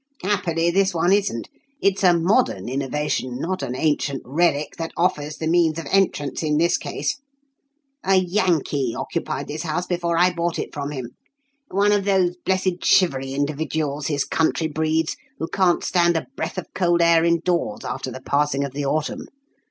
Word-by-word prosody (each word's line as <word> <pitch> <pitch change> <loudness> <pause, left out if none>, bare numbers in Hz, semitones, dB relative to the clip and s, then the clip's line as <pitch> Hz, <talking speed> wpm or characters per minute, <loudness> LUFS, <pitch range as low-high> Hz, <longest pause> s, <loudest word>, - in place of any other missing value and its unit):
"Happily, 175 -4 +1
this 195 0 +2
one 175 +3 +3
isn't. 200 - 0 0.3
It's 195 0 +1
a 175 -2 +6
modern 170 - +1
innovation, 135 -1 -2
not 185 +3 -2
an 125 -2 -3
ancient 145 -1 0
relic, 150 +1 0
that 165 0 -3
offers 150 -4 0
the 160 - -4
means 165 -1 +3
of 165 - -5
entrance 180 -8 +1
in 150 -2 +1
this 170 +2 +3
case. - - -3 0.9
A 195 - +3
Yankee 175 - +1
occupied - - -3
this 155 +1 -4
house 170 +2 -2
before 175 -2 -1
I 180 +1 +4
bought 170 0 -1
it - - -4
from 145 -1 -4
him 130 -5 -6 0.6
one 200 +2 +2
of 205 -1 +2
those 185 -3 +2
blessed 185 -1 0
shivery 135 -7 +3
individuals 145 0 -2
his 145 -2 0
country 160 0 +1
breeds, 160 +1 0 0.2
who 160 - -3
can't 185 -2 +2
stand 175 -2 +2
a - - -3
breath 160 +4 -4
of 185 - -6
cold 175 -2 +2
air 170 -1 +5
indoors 175 +9 0
after 130 0 -4
the 130 +1 -8
passing 140 0 +1
of 140 - -4
the 145 +1 -3
autumn. 155 +2 -2
165 Hz, 170 wpm, -22 LUFS, 145-180 Hz, 0.9 s, a